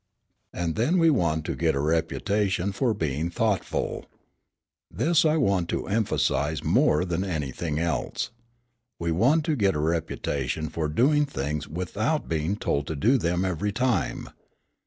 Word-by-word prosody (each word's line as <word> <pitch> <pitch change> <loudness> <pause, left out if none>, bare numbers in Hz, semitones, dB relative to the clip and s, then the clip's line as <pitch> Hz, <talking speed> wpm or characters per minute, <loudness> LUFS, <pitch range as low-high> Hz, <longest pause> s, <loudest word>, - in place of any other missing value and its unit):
"And 85 -2 -2
then 150 +12 +2
we 165 -2 +5
want 80 - +1
to - - -2
get - - +1
a - - 0
reputation 95 +5 0
for 115 +2 0
being 80 -1 -1
thoughtful. 105 +2 -1 0.8
This 165 0 +2
I 155 0 +3
want 100 - +1
to - - -2
emphasise 80 -8 0
more 75 +4 +3
than 90 0 -1
anything 80 -3 -3
else. 80 - -2 0.7
We 85 0 -2
want 135 - +3
to 155 - +1
get 100 - +2
a - - -1
reputation 80 -2 -2
for 80 +1 -2
doing 145 - +3
things 75 - -3
without 105 - -2
being 80 +4 -1
told 70 -8 -1
to 80 - -3
do 120 - +3
them 90 0 0
every 95 +3 -1
time. 115 - -1
90 Hz, 150 wpm, -26 LUFS, 80-110 Hz, 0.8 s, we